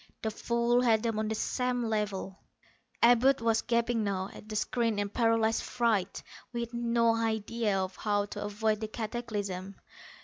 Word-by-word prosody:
The 220 - 0
fool 235 +2 +1
had 225 -3 +3
them 225 -2 0
on 215 - -1
the 220 - -1
same 250 +2 -1
level. 210 -4 -2 0.6
Abud 245 +3 +6
was 230 -1 +2
gaping 235 -1 +1
now 195 -1 -2
at 215 - -12
the 215 - -5
screen 230 0 0
in 205 0 -1
paralyzed 225 0 +2
fright, 225 -6 0 0.3
with 235 -1 -4
no 235 -1 +2
idea 225 -1 0
of 190 -1 -3
how 205 -1 0
to 205 - -6
avoid 215 +1 0
the 220 - -3
cataclysm. 210 -4 -4
225 Hz, 160 wpm, -30 LUFS, 210-235 Hz, 0.6 s, Abud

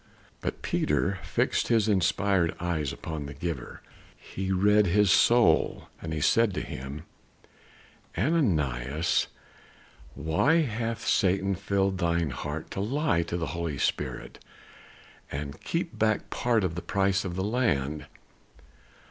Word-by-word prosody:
But - - -5
Peter 100 -1 0
fixed - - 0
his 110 -2 +3
inspired 95 -3 +2
eyes 80 -5 -1
upon 80 -3 -6
the 70 - -8
giver. 75 -3 -5 0.3
He 95 0 -5
read 105 +2 +4
his 100 +1 +4
soul. 120 +5 +4
And 80 - -5
he 80 - -2
said 105 +5 +3
to - - -1
him: 70 0 -7 1.1
"Ananias, 75 - +1 0.9
why 110 - +2
hath 115 -3 -3
Satan 95 +1 +2
filled 100 0 0
thine 85 -4 +1
heart 75 +4 -5
to - - -4
lie 115 - +1
to 85 +1 -3
the 85 - -2
Holy 85 -4 -3
Spirit, - - -3 0.9
and 70 +1 -5
keep 170 0 -3
back 110 -1 +1
part 120 -4 +1
of 90 -3 -1
the 85 - -4
price 95 +1 +1
of 90 -3 -4
the 95 - -1
land? 75 - 0
95 Hz, 130 wpm, -28 LUFS, 80-105 Hz, 1.1 s, read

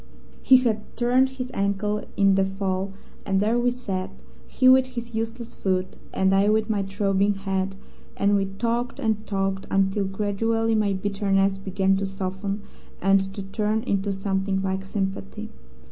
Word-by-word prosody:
"He 260 - +7
had 225 -4 -1
turned 250 +2 +3
his 255 0 -4
ankle 200 +1 0
in 195 -1 +5
the 195 0 +3
fall, 195 0 -2 0.3
and 195 -1 +1
there 220 +4 +2
we 245 +1 +3
sat, 200 -7 -3 0.4
he 255 - +2
with 260 0 +7
his 240 -2 -7
useless 225 +1 -4
foot, 185 -1 -1 0.2
and 190 0 +2
I 195 +1 +4
with 220 +1 +2
my 205 -2 +1
throbbing 195 +1 +1
head, 195 0 -2 0.4
and 200 +1 +3
we 195 -1 +1
talked 235 +5 -2
and 220 -1 -1
talked 195 -1 -1
until 195 +1 +1
gradually 220 +3 0
my 210 -2 +2
bitterness 195 0 +1
began 195 0 +1
to 195 0 -1
soften 195 +1 -4 0.4
and 195 0 +3
to 200 - -5
turn 215 +2 -1
into 200 0 0
something 195 0 -1
like 190 0 -2
sympathy. 195 +2 -4
200 Hz, 160 wpm, -25 LUFS, 195-220 Hz, 0.4 s, He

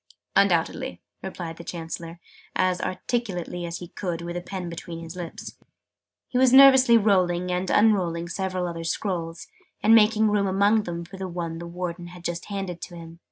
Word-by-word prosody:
"Undoubtedly!" - - +2 0.2
replied 170 -3 -6
the 170 - -9
Chancellor, 165 0 -6 0.4
as 185 -1 +1
articulately 185 -5 -3
as 170 0 -4
he 175 -1 -9
could 170 -3 -4
with 175 0 -5
a 175 - -3
pen 185 0 -6
between 170 0 -7
his 165 +1 -8
lips. 175 -2 -8 0.7
He 250 - -1
was 260 -1 +5
nervously 265 -3 +8
rolling 180 -4 +2
and 180 +1 -1
unrolling 180 -6 +2
several 185 0 -2
other 165 -1 -5
scrolls, 165 -1 -3 0.4
and 220 - +6
making 220 -1 +5
room 205 -1 +2
among 205 +3 +3
them 170 -1 -5
for 190 +3 -11
the 190 0 -4
one 170 -2 -4
the 170 - -7
Warden 175 0 -5
had 175 0 -12
just 175 -1 -3
handed 195 -4 -5
to 175 - -8
him. 165 0 -11
180 Hz, 175 wpm, -25 LUFS, 170-200 Hz, 0.7 s, nervously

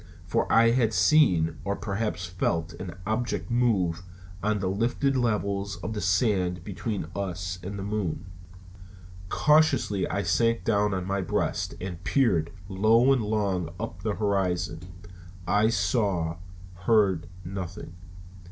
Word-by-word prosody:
For - - 0
I 115 0 +6
had 115 -3 +2
seen, 90 - +4
or 100 0 -1
perhaps 100 -3 -3
felt, 85 -1 -1
an 90 -3 -7
object 115 +3 -2
move 100 -9 +1 0.4
on 105 +1 +1
the 95 -2 -2
lifted 120 +8 0
levels 100 -5 0
of 110 -1 -3
sand 90 -2 +1
between 100 0 -4
us 90 -2 -3
and 100 +3 -6
the 95 - -4
moon. 100 -5 -2 1.0
Cautiously 145 -10 +3
I 100 +1 -1
sank 115 +5 +1
down 105 -2 +2
on 95 -1 -3
my 100 +1 -1
breast 90 - -1
and 90 -1 -6
peered 90 - +2 0.2
low 110 +7 +4
and 130 - +1
long 100 -6 -1
up 90 - -5
the 105 +1 -1
horizon. 95 -5 0 0.7
I 105 +4 +3
saw, 95 -9 0 0.4
heard 95 -2 +2 0.2
nothing. 90 -2 -6
100 Hz, 130 wpm, -27 LUFS, 90-110 Hz, 1.0 s, I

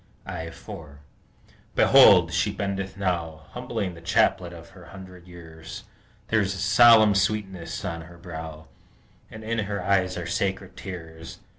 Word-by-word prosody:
I 80 0 -6
4 75 -3 -11 0.8
Behold! - - +6
she - - +1
bendeth 95 -1 -4
now, 85 -5 -3
Humbling 115 -7 -4
the 85 - -13
chaplet 85 +1 +1
of 85 -1 -12
her 90 -2 -15
hundred 95 -1 -13
years. 80 -2 -11 0.5
There 110 -1 +3
is 95 -1 -2
a - - -7
solemn 110 +2 +6
sweetness 100 -3 -2
on 85 -2 -4
her 85 +1 -13
brow, 80 -2 -9 0.6
And 110 - -10
in 115 +1 -2
her 100 -2 -3
eyes 95 -1 +1
are 90 - -5
sacred 95 0 -3
tears. 80 -4 -9
90 Hz, 145 wpm, -25 LUFS, 85-100 Hz, 0.8 s, Behold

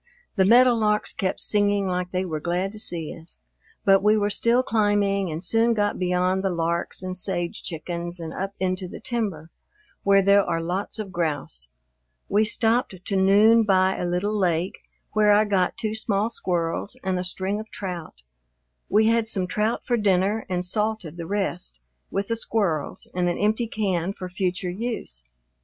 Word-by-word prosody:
The 190 -3 +3
meadowlarks 225 -2 +4
kept 185 -2 -2
singing 205 -1 +2
like 180 -1 -2
they 185 +1 -1
were 160 -4 -3
glad 180 +4 -1
to 215 - -7
see 165 -6 -1
us. 165 +1 -9 0.4
But 195 -1 +5
we 210 +2 +4
were 205 0 0
still 235 +4 +3
climbing 205 -4 +1
and 160 +3 -5
soon 225 +4 +2
got 205 -1 0
beyond 180 +1 +1
the 195 - +1
larks 170 +1 -2
and 185 0 -4
sage 175 -2 -2
chickens 170 +1 -5
and 160 -1 -6
up 195 +1 -4
into 185 0 0
the - - -9
timber, 200 -10 -3 0.5
where 195 0 +4
there 200 +1 +5
are 170 -2 -1
lots 180 +7 -2
of 210 -3 -5
grouse. 145 - -3 0.6
We 205 +2 +3
stopped 225 0 +1
to 200 - -2
noon 205 +4 +5
by 190 -3 +3
a - - -3
little 185 +5 -1
lake, 180 -3 0 0.3
where 210 -1 +4
I 210 +1 +4
got 190 -3 +1
two 215 -2 -2
small 220 0 0
squirrels 175 +3 -2
and 190 -1 0
a - - -2
string 190 +3 -2
of 220 0 -8
trout. 175 - -7 0.7
We 215 +2 +4
had 230 0 +2
some 195 -5 +1
trout 210 +5 -1
for 240 - +1
dinner 205 +1 +1
and 180 -1 -1
salted 210 -4 -2
the 165 -1 -6
rest 185 - -3 0.3
with 200 +2 -2
the 230 - +1
squirrels 200 -9 -1
in 180 0 0
an 175 - 0
empty 220 +3 +1
can 195 -4 -1
for 185 -2 -7
future 180 -1 -2
use. 190 - -5
195 Hz, 175 wpm, -24 LUFS, 180-210 Hz, 0.7 s, But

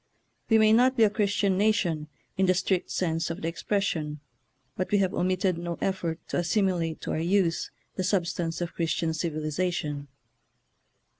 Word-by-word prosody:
We 225 - +6
may 215 0 +5
not 255 +3 +4
be 225 - +6
a 210 - +4
Christian 200 -3 +1
nation 175 -8 +1 0.3
in 190 0 +2
the 185 - +4
strict 185 0 0
sense 165 -2 -1
of 165 - -4
the - - 0
expres 195 +4 -1
sion, 150 -6 -2 0.6
but 185 - -2
we 205 - +3
have 195 -1 +1
omitted 185 -1 +1
no 170 0 -4
effort 175 -4 -1
to - - -1
as 175 -1 -1
similate 180 -6 +1
to - - -4
our - - -1
use 175 0 +1 0.3
the 185 - 0
substance 175 -3 -1
of 175 - -3
Chris 165 -2 0
tian 160 -1 -1
civilization. 155 -2 -2
180 Hz, 175 wpm, -27 LUFS, 165-195 Hz, 0.6 s, We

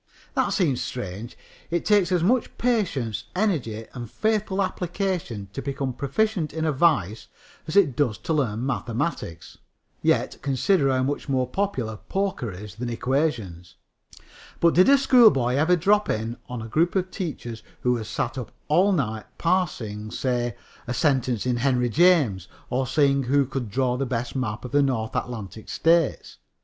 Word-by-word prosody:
That - - +1
seems 150 - +1
strange. 115 -1 -6 0.3
It 170 0 -1
takes 205 -4 +3
as 175 -2 +2
much 240 +7 +1
patience, 185 - 0
energy 140 - -1
and 120 -3 -7
faithful 210 - 0
application 180 - -3
to 135 - -4
become 135 -2 -3
proficient 165 - -1
in 160 0 -1
a 155 - +2
vice 130 - +1 0.4
as 155 - -4
it 170 -11 +4
does 120 -7 +1
to 160 - -3
learn 125 -6 0
mathematics. 120 - -3 0.4
Yet - - +1
consider 140 +3 +2
how 130 -1 +2
much 145 +2 -3
more 130 -2 +1
popular 125 - -2
poker 190 - -2
is 100 +2 -9
than 120 +4 -5
equations! 115 - -2 0.8
But 170 -1 +4
did 185 +6 +6
a 280 - +7
schoolboy 225 - +5
ever 155 +6 +3
drop 205 +5 +2
in 110 +2 -2
on 125 -2 -5
a - - -7
group 165 - +1
of 185 -1 0
teachers 125 - -5 0.2
who 125 -1 +2
had 110 -2 -6
sat 130 - -2
up 125 - -7 0.2
all 185 +7 +4
night 110 - -2
parsing, 120 - -1
say, 120 -1 -1 0.3
a 125 - -2
sentence 130 -6 +1
in 125 -1 +1
Henry 125 -1 +1
James, 140 - +3 0.2
or 130 +1 0
seeing 140 0 +3
who 140 +2 +2
could 130 -3 -4
draw 125 +3 0
the 135 0 -1
best 120 0 -3
map 105 -4 -3
of 125 - -7
the 145 +1 +4
North 130 -2 -1
Atlantic 110 -4 -5
states? 165 -2 +1
135 Hz, 160 wpm, -25 LUFS, 115-170 Hz, 0.8 s, a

